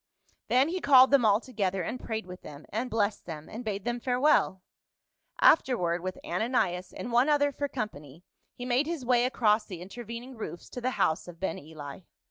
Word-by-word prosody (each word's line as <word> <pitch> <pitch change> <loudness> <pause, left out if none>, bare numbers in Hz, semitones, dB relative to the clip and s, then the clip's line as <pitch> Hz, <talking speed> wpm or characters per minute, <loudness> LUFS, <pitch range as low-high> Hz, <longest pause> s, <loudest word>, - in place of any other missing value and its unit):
Then 260 +5 +3
he 365 +2 -3
called 265 -2 +7
them 275 -5 +5
all 205 0 +5
together, 195 -7 -2
and 250 - -4
prayed 220 -2 -3
with 180 0 -10
them, 145 0 -11
and 235 +5 -3
blessed 210 -4 -1
them, 155 -2 -7
and 230 +3 -7
bade 205 -2 -4
them 240 0 -1
farewell. 250 -7 +2 0.8
Afterward 180 - +3
with 185 +1 -4
Ananias 180 -3 -1
and 240 - -6
one 245 +5 +4
other 290 -1 +3
for 285 +1 -3
company, 165 - -6 0.3
he 245 - -7
made 255 +4 +1
his 325 -6 -4
way 245 0 +3
across 220 -4 +2
the 185 -5 -7
intervening 235 +6 -8
roofs 175 -7 -7
to 250 - -6
the 255 - 0
' - - -6
house 160 - +1
of 170 -1 -11
Ben 190 -3 -2
Eli. 145 -1 -9
225 Hz, 195 wpm, -28 LUFS, 180-255 Hz, 0.8 s, called